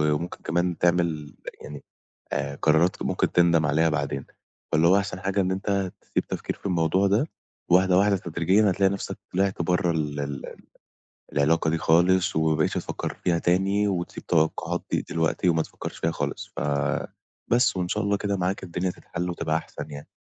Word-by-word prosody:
وممكن 85 +4 -5
كمان 85 +1 0
تعمل 85 -4 0 0.3
يعني 75 -1 -9 0.5
آآ، 70 0 -2
قرارات 80 +4 +2
ممكن - - 0
تندم 85 -2 +4
عليها 80 +2 +3
بعدين، 70 -3 -2 0.5
فاللي 80 +2 +4
هو 95 - +6
أحسن 100 -2 -3
حاجة 100 +1 0
إن 95 -1 +1
أنت 95 -1 -1
تسيب - - -2
تفكير - - -4
في - - -9
الموضوع 90 +1 +2
ده 105 +9 +2 0.4
وواحدة، 90 +1 +5
واحدة 100 0 +4
تدريجيًا 90 +5 +2
هتلاقي 95 +1 +2
نَفْسك 100 0 -4 0.2
طلعت 95 -1 +1
برّه 90 +1 +1
ال 75 -2 -2
ال 70 -1 -5 0.8
العلاقة 80 +3 +2
دي 80 - +1
خالص، 90 +3 +3
وما 80 0 +2
بقيتش 75 - +1
تفكّر - - -3
فيها 85 -2 +2
تاني 95 +4 +2
وتسيب 90 -3 -3
التوقّعات 80 -2 0
دي - - +1
دلوقتي 80 +2 +1
وما 80 -1 +3
تفكّرش - - -8
فيها 80 - 0
خالص، - - -4
ف - - -2 0.9
بس 120 -4 +3
وإن 90 -1 -1
شاء 105 +4 -1
الله 100 0 +1
كده 100 0 -1
معاك 95 +2 -1
الدنيا 90 +1 -2
تتحلّ 90 0 -5
وتبقى 80 -2 -1
أحسن 80 - -8
يعني. 70 0 -8
90 Hz, 170 wpm, -25 LUFS, 80-95 Hz, 0.9 s, هو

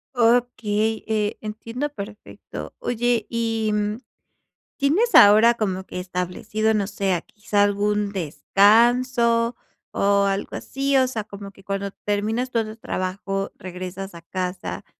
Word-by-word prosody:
Okey, 225 -2 +1
eh, 215 -1 0
entiendo 230 +6 -4
perfecto. 210 -5 -9
Oye, 240 - 0
y, 225 -2 -1
mm, 210 0 -1 0.8
¿tienes 375 +12 +2
ahora 215 +3 +8
como 190 -5 -2
que 180 - -6
establecido, 180 +4 -1
no 205 -3 0
sé, 195 -4 -1
quizá 210 -1 0
algún 205 0 +1
descanso 230 - +3 0.4
o 200 0 +3
algo 195 0 -2
así? 275 0 -1
O 260 -1 +5
sea, 225 -5 -4
como 200 -1 -9
que 195 -1 -19
cuando 195 0 -3 0.2
terminas 220 +5 0
todo 225 -3 -1
el 220 - -11
trabajo 195 0 -3
regresas 185 +1 -7
a 170 - -11
casa, 180 +1 -4
210 Hz, 130 wpm, -23 LUFS, 195-230 Hz, 0.8 s, ahora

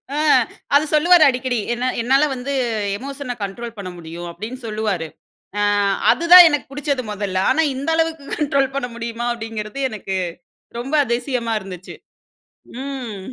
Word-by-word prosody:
ஆ - - -2 0.6
அது 295 +2 +5
சொல்லுவாரு 335 +2 +6
அடிக்கடி 255 -2 0 0.2
"என்ன 250 +2 -1
என்னால 270 +5 +3
வந்து 255 +3 -4 0.4
எமோஷன 275 -1 -6
கண்ட்ரோல் 230 +4 -6
பண்ண 195 -2 -6
முடியும்" 170 +1 -8
அப்டீன்னு 215 +9 -7
சொல்லுவாரு. 210 -6 -2 0.5
அ - - +1 0.5
அதுதான் 350 +2 +9
எனக்கு 295 -2 -1
புடிச்சது 285 -2 -2
மொதல்ல. 200 -2 -3
ஆனா 315 +5 +3
இந்த 275 +4 -3
அளவுக்கு 320 -2 -1
கண்ட்ரோல் 275 -2 +1
பண்ண 260 -3 -1
முடியுமா? 235 0 -4
அப்டீங்குறது 225 +1 -6
எனக்கு 200 -3 -5 0.6
ரொம்ப 265 +5 -6
அதிசயமா 240 -1 -1 1.0
இருந்துச்சு.ம். 250 -6 -8
250 Hz, 130 wpm, -20 LUFS, 220-280 Hz, 1.0 s, அதுதான்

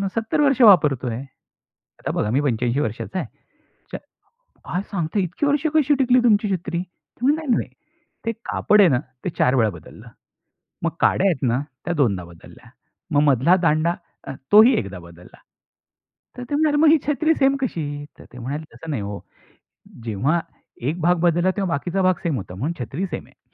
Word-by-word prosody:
"70 225 +6 0
वर्ष 275 -3 +3
वापरतोय. 145 - +5 0.8
आता - - -3
बघा, 105 - 0
मी 135 - +2
85 125 -1 0
वर्षाचा 115 - -4
आहे." 155 - -4 0.4
"अच्छा, - - -10 0.7
काय 180 - 0
सांगता, 175 +1 -2
इतकी 180 - -1
वर्ष 290 +2 +1
कशी 295 -2 +4
टिकली 255 -1 +4
तुमची 210 -3 +3
छत्री?" 175 -1 -4
"ते 185 +6 -10
म्हणले, 310 +2 +1
नाही. - - -4 0.6
ते 230 - +1
कापड 210 -1 +3
आहे 185 - +6
ना, 125 -4 +2 0.3
ते - - 0
4 125 - +3
वेळा 115 -4 +3
बदललं. - - -13 0.8
मग - - +1
काड्या 195 - +3
आहेत 165 -8 -1
ना, 120 +3 +1 0.2
त्या 175 - -2
दोनदा 110 - +1
बदलल्या. 85 -1 -16 0.4
मग 145 - +4
मधला 140 +4 +4
दांडा, 160 +1 +2 0.3
अ, 135 - -5 0.2
तोही 220 +5 +8
एकदा 95 -2 -5
बदलला." 85 +1 -15 1.0
तर 250 - -7
ते - - -1
म्हणाले, 300 -1 +2
"मग 320 - +6
ही 315 +1 +6
छत्री 315 +2 +2
सेम 275 -1 +2
कशी?" 175 - -2 0.3
तर - - -13
ते 125 - -11
म्हणाले, 140 +6 -5
"तसं 160 - -9
नाही 125 -8 -2
हो. 100 0 -5 0.9
जेव्हा 125 - 0 0.5
एक 165 +4 -4
भाग 175 +2 +3
बदलला, 175 +2 +2
तेव्हा 195 -2 -1
बाकीचा 175 +6 -2
भाग 185 -1 +3
सेम 165 -4 0
होता 90 -3 -8
म्हणून 140 - -2
छत्री 145 - -4
सेम - - -6
आहे." - - -29
170 Hz, 180 wpm, -22 LUFS, -, 1.0 s, तोही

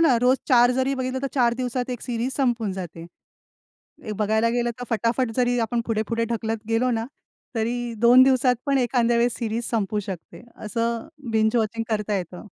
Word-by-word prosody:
ना, 285 -8 +5
रोज 255 +2 +4
4 245 -2 +6
जरी 260 +2 0
बघितलं, 260 0 -2
तर - - 0
4 240 -3 +3
दिवसात 250 0 -2
1 245 - -4
सीरीज 245 +1 -2
संपून 235 -7 0
जाते. 170 -3 -7 1.0
एक 215 - -4
बघायला 220 +2 +2
गेलं 240 0 0
तर - - -4
फटाफट 230 +2 0
जरी 245 -1 +2
आपण 235 +1 0
पुढे-पुढे 230 +1 -1
ढकलत 225 -1 -2
गेलो 245 +2 +2
ना, 225 0 -1 0.5
तरी 235 +1 -2
2 245 +2 +7
दिवसात 255 -1 +3
पण 280 -1 +2
एखांद्या 240 -2 +2
वेळेस 240 0 +2
सीरीज 230 0 -2
संपू 215 -2 0
शकते. 190 -2 -8
असं 230 +1 -3 0.2
बिंज 220 +1 +2
वॉचिंग 225 0 0
करता 210 -1 -1
येतं. 180 +1 -7
235 Hz, 175 wpm, -24 LUFS, 220-250 Hz, 1.0 s, 2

